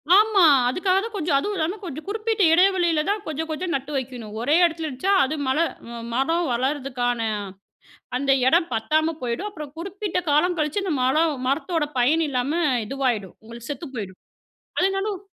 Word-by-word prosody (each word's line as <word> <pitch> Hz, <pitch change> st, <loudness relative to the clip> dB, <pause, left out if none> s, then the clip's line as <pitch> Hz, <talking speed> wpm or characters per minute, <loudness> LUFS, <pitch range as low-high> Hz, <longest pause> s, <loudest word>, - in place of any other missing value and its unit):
ஆமா. 420 Hz, -1 st, +5 dB, 0.3 s
அதுக்காக 370 Hz, +6 st, +1 dB
தான் 455 Hz, -1 st, -6 dB
கொஞ்சம், 315 Hz, -7 st, +1 dB
அதுவும் 410 Hz, +6 st, -3 dB
இல்லாம 335 Hz, +6 st, -1 dB
கொஞ்சம் 315 Hz, -2 st, -7 dB
குறிப்பிட்ட 435 Hz, 0 st, -1 dB
எடை 360 Hz, +3 st, +6 dB
வெளியில 340 Hz, -4 st, +2 dB
தான், 415 Hz, 0 st, 0 dB
கொஞ்சம் 320 Hz, +1 st, -4 dB
கொஞ்சம் 340 Hz, +2 st, -3 dB
நட்டு 275 Hz, +2 st, -4 dB
வைக்கணும். 245 Hz, -5 st, -6 dB
ஒரே 290 Hz, +6 st, +2 dB
எடத்துல 325 Hz, -1 st, -2 dB
இருந்த்ச்சா 300 Hz, +9 st, 0 dB
அது 290 Hz, +4 st, -1 dB
மழ 260 Hz, +2 st, +1 dB, 0.6 s
மரம் 330 Hz, +7 st, +1 dB
வளர்றதுக்கான 250 Hz, -2 st, -1 dB, 1.0 s
அந்த 275 Hz, +1 st, +1 dB, 0.2 s
எடம் 330 Hz, +3 st, +3 dB
பத்தாம 310 Hz, +8 st, +1 dB
போயிடும். 250 Hz, -, -2 dB
அப்புறம் 300 Hz, -7 st, -9 dB
குறிப்பிட்ட 390 Hz, +2 st, -4 dB
காலம் 345 Hz, +5 st, +2 dB
கழிச்சு, 305 Hz, +7 st, 0 dB
இந்த 370 Hz, -5 st, -1 dB
மழ 260 Hz, +2 st, +2 dB, 0.3 s
மரத்தோட 300 Hz, +3 st, 0 dB
பயன் 310 Hz, +7 st, +3 dB
இல்லாம 255 Hz, +1 st, -1 dB, 0.3 s
இதுவாயிடும். 245 Hz, -6 st, -2 dB
உங்களுக்கு 235 Hz, +2 st, -10 dB
செத்து 315 Hz, +2 st, -6 dB
போயிரும். 190 Hz, -4 st, -6 dB, 0.6 s
அதனாலும் 390 Hz, +1 st, 0 dB
310 Hz, 155 wpm, -23 LUFS, 260-365 Hz, 1.0 s, எடை